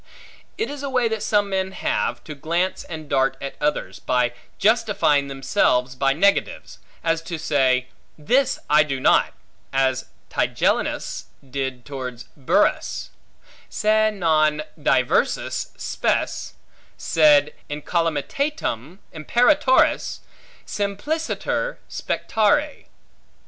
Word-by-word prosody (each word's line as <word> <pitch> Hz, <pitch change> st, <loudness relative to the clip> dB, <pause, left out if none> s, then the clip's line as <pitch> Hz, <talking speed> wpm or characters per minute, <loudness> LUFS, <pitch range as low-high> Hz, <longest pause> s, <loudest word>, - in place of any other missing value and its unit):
It 440 Hz, -, -2 dB
is 290 Hz, -1 st, -7 dB
a 280 Hz, -, -3 dB
way 250 Hz, -3 st, +2 dB
that 220 Hz, -1 st, -3 dB
some 205 Hz, -1 st, +2 dB
men 190 Hz, 0 st, -1 dB
have, -, -, -1 dB
to 155 Hz, -, -7 dB
glance 170 Hz, +6 st, -1 dB
and 155 Hz, -2 st, -8 dB
dart 135 Hz, -1 st, +1 dB
at 140 Hz, -, -5 dB
others, 150 Hz, 0 st, -1 dB
by 125 Hz, -1 st, +1 dB, 0.2 s
justifying 205 Hz, -10 st, +2 dB
themselves 130 Hz, -2 st, +1 dB
by 135 Hz, +1 st, +1 dB
negatives; 200 Hz, +8 st, 0 dB, 0.2 s
as 165 Hz, 0 st, +1 dB
to 165 Hz, 0 st, -5 dB
say, 130 Hz, -4 st, +1 dB, 0.3 s
This 250 Hz, -, +2 dB
I 150 Hz, +1 st, +5 dB
do 140 Hz, -3 st, -1 dB
not; -, -, +3 dB, 0.4 s
as 135 Hz, -1 st, +1 dB, 0.3 s
Tigellinus -, -, 0 dB, 0.2 s
did 130 Hz, -2 st, -4 dB
towards 130 Hz, -4 st, -6 dB
Burrhus, 135 Hz, -3 st, +1 dB, 0.6 s
Se 215 Hz, 0 st, +2 dB
non 155 Hz, -6 st, +2 dB
diversas -, -, +1 dB
spes, -, -, -1 dB, 0.4 s
sed 150 Hz, -2 st, +4 dB, 0.2 s
incolumitatem 165 Hz, -, -2 dB, 0.2 s
imperatoris 250 Hz, -, +2 dB, 0.4 s
simpliciter 310 Hz, -, -2 dB
spectare. 225 Hz, +8 st, 0 dB
155 Hz, 100 wpm, -22 LUFS, 135-215 Hz, 0.6 s, I